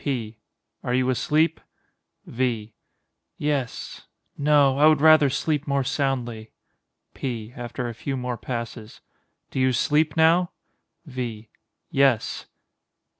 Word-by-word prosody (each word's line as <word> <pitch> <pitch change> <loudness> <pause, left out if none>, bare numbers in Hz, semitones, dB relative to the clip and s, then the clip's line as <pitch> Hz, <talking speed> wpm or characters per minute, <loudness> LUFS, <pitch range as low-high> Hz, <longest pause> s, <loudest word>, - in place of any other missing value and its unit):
P. 115 -6 -3 0.4
Are 125 - 0
you 130 0 +2
asleep? 155 +5 +1 0.6
V. 115 -3 -2 0.6
Yes—no; 145 0 0
I 150 - +7
would 155 -2 +5
rather 155 -2 +6
sleep 150 +2 -1
more 140 -1 +1
soundly. 125 -5 -2 0.6
P. 120 -3 -5
[After 120 +1 -5
a 120 - -5
few 135 +4 -4
more 125 -1 -3
passes.] 115 -1 -6 0.5
Do - - -3
you 130 0 +3
sleep 150 +5 +1
now? 170 +2 +4 0.5
V. 120 -6 -6 0.4
Yes. 135 -5 +1
130 Hz, 110 wpm, -24 LUFS, 120-145 Hz, 0.6 s, I